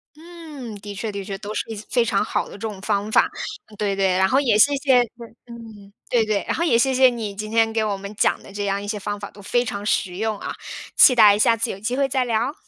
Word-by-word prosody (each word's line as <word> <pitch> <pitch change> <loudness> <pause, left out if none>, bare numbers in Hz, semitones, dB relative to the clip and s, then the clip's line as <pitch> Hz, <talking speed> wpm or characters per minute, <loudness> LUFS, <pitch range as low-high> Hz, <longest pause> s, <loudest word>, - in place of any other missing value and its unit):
嗯， 315 -8 -10
的 205 0 -8
确 210 +2 -4
的 200 -1 -5
确， 195 -1 -5
都 210 0 -6
是 - - -1
一 - - -5
些 210 - -8
非 240 -2 +2
常 200 -1 +1
好 - - -2
的 - - -13
这 200 - -11
种 210 -3 -5
方 205 +2 -1
法。 - - +5 0.4
嗯 215 - -16
对 200 -2 -1
对， 195 -1 +2
然 190 +1 +3
后 265 - +3
也 240 -7 +2
谢 285 +5 +5
谢 270 -3 +3 0.5
嗯， 225 -4 -12 0.2
对 235 -2 +3
对， 215 -2 -1
然 - - 0
后 335 - -1
也 240 -9 +3
谢 265 +2 +2
谢 260 0 +6
你 225 -4 -5
今 215 +1 -6
天 225 0 +2
给 220 -1 +1
我 205 -2 -1
们 200 +2 -8
讲 - - +1
的 195 - -13
这 205 0 -3
样 200 0 -1
一 205 - -7
些 210 0 -3
方 205 +1 -4
法， 205 - -8
都 200 - -14
非 240 +5 0
常 200 -2 -5
实 185 -3 -1
用 220 -1 -2
啊。 - - -6 0.4
期 255 - +7
待 210 -3 +7
下 230 +1 +4
次 230 +2 -2
有 195 - -8
机 240 +5 -2
会 275 -1 +2
再 260 -1 0
聊。 235 +3 0
215 Hz, 295 characters per minute, -22 LUFS, 205-245 Hz, 0.5 s, 期